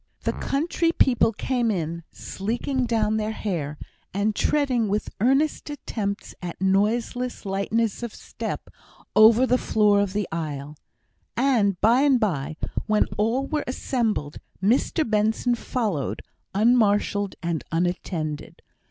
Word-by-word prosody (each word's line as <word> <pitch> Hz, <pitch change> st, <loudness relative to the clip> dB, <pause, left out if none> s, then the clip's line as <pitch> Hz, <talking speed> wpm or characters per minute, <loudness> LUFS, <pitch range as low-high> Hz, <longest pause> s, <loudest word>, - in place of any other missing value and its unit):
The -, -, 0 dB
country 330 Hz, +3 st, 0 dB
people 245 Hz, -7 st, +3 dB
came 240 Hz, +2 st, -1 dB
in 170 Hz, -4 st, -2 dB
sleeking 240 Hz, +5 st, -2 dB
down 220 Hz, -2 st, +1 dB
their 215 Hz, 0 st, -1 dB
hair, 160 Hz, -9 st, -3 dB, 0.4 s
and 205 Hz, +1 st, +1 dB
treading 260 Hz, -7 st, +1 dB
with 205 Hz, +2 st, -1 dB
earnest 270 Hz, +8 st, +2 dB
attempts 215 Hz, -8 st, -4 dB
at 175 Hz, -2 st, -6 dB
noiseless 225 Hz, +6 st, 0 dB
lightness 200 Hz, +3 st, 0 dB
of 235 Hz, -2 st, -4 dB
step -, -, -6 dB, 0.4 s
over 225 Hz, +3 st, +7 dB
the 250 Hz, 0 st, +2 dB
floor 210 Hz, -2 st, +3 dB
of 200 Hz, -2 st, 0 dB
the 205 Hz, -2 st, -1 dB
aisle; 150 Hz, -3 st, -4 dB, 0.6 s
and 230 Hz, -8 st, +2 dB
by 235 Hz, +5 st, +5 dB
and 280 Hz, -3 st, +4 dB
by, 155 Hz, -, -1 dB, 0.3 s
when 215 Hz, -1 st, +3 dB
all 235 Hz, +6 st, +1 dB
were 300 Hz, +1 st, -1 dB
assembled, 225 Hz, -, -1 dB, 0.2 s
Mr 235 Hz, -, +2 dB
Benson 220 Hz, +3 st, +1 dB
followed, 215 Hz, -, -2 dB, 0.3 s
unmarshalled 205 Hz, -3 st, +3 dB
and 170 Hz, -2 st, -1 dB
unattended. 165 Hz, -3 st, -2 dB
215 Hz, 125 wpm, -24 LUFS, 195-245 Hz, 0.6 s, over